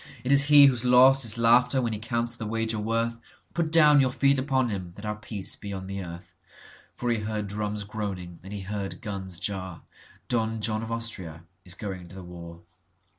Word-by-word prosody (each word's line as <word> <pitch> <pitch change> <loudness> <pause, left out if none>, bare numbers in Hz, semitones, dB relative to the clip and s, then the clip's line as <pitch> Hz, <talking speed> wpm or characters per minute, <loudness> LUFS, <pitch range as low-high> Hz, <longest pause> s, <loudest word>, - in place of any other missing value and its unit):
It 130 - -1
is 140 0 +7
he 145 -1 +8
whose 125 -3 +2
loss 130 +2 +6
is 115 +1 +1
laughter 125 +3 +4
when 120 -3 -1
he 105 - -4
counts 115 +1 0
the 110 -2 -6
wager 115 0 -2
worth, 115 +2 -1 0.3
Put 165 -2 -1
down 150 -3 +6
your 130 - +2
feet 140 +1 +2
upon 130 -2 0
him, 95 -4 -5
that 100 - -10
our 105 0 -2
peace 105 -2 -2
be 100 - -8
on 95 -1 -6
the 100 0 -5
earth."For 90 +7 -9
he 115 - 0
heard 105 0 -3
drums 105 0 -3
groaning 100 -5 -6
and 95 - -10
he 100 -1 -5
heard 100 0 -5
guns 95 -4 -4
jar,(Don 100 +4 -5
John 110 0 -1
of 115 0 -6
Austria 95 -9 -2 0.2
is 90 0 -7
going 95 -5 -7
to 85 - -12
the 95 - -9
war.) 85 -1 -11
110 Hz, 195 wpm, -26 LUFS, 95-120 Hz, 0.3 s, he